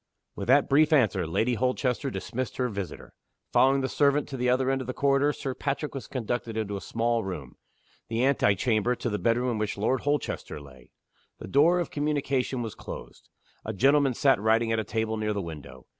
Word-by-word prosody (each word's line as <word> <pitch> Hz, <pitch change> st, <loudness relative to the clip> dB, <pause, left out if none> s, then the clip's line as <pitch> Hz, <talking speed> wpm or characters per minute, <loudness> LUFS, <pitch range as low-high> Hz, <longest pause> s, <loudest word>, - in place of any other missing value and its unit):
With -, -, -5 dB
that 135 Hz, +3 st, +5 dB
brief 150 Hz, +3 st, +4 dB
answer, 105 Hz, -, +3 dB
Lady 115 Hz, +9 st, +1 dB
Holchester 125 Hz, +2 st, 0 dB
dismissed 130 Hz, -2 st, -4 dB
her 125 Hz, -1 st, 0 dB
visitor. 100 Hz, -4 st, -7 dB, 0.4 s
Following 135 Hz, +1 st, +4 dB
the 130 Hz, -, 0 dB
servant 145 Hz, +1 st, +2 dB
to 135 Hz, -, -5 dB
the 125 Hz, 0 st, +1 dB
other 130 Hz, +1 st, +2 dB
end 135 Hz, 0 st, 0 dB
of 130 Hz, -, -7 dB
the 130 Hz, -, -4 dB
corridor, 140 Hz, +1 st, +3 dB
Sir 135 Hz, -2 st, -4 dB
Patrick 140 Hz, +3 st, -3 dB
was 135 Hz, -, -6 dB
conducted 120 Hz, -2 st, -3 dB
into 105 Hz, -2 st, -2 dB
a 100 Hz, -, -5 dB
small 115 Hz, 0 st, 0 dB
room 75 Hz, -9 st, -6 dB, 0.5 s
the 115 Hz, +2 st, 0 dB
ante 130 Hz, -7 st, +3 dB
chamber 115 Hz, +3 st, +1 dB
to 120 Hz, -, -3 dB
the 105 Hz, -, -2 dB
bedroom 120 Hz, +2 st, +1 dB
in 115 Hz, -, -2 dB
which 105 Hz, -1 st, -2 dB
Lord 120 Hz, +6 st, 0 dB
Holchester 145 Hz, -, -2 dB
lay. 65 Hz, -3 st, -15 dB, 0.5 s
The -, -, -9 dB
door 165 Hz, +6 st, +4 dB
of 175 Hz, -, -3 dB
communication 140 Hz, -4 st, -1 dB
was 110 Hz, -, -5 dB
closed. -, -, -10 dB, 0.3 s
A 110 Hz, -, -4 dB
gentleman 135 Hz, +4 st, +3 dB
sat 135 Hz, -6 st, +3 dB
writing 115 Hz, +1 st, +2 dB
at 110 Hz, -, +1 dB
a -, -, -1 dB
table 110 Hz, +1 st, -2 dB
near 105 Hz, 0 st, -1 dB
the 100 Hz, -, -2 dB
window. 80 Hz, -4 st, -9 dB
125 Hz, 205 wpm, -27 LUFS, 110-135 Hz, 0.5 s, that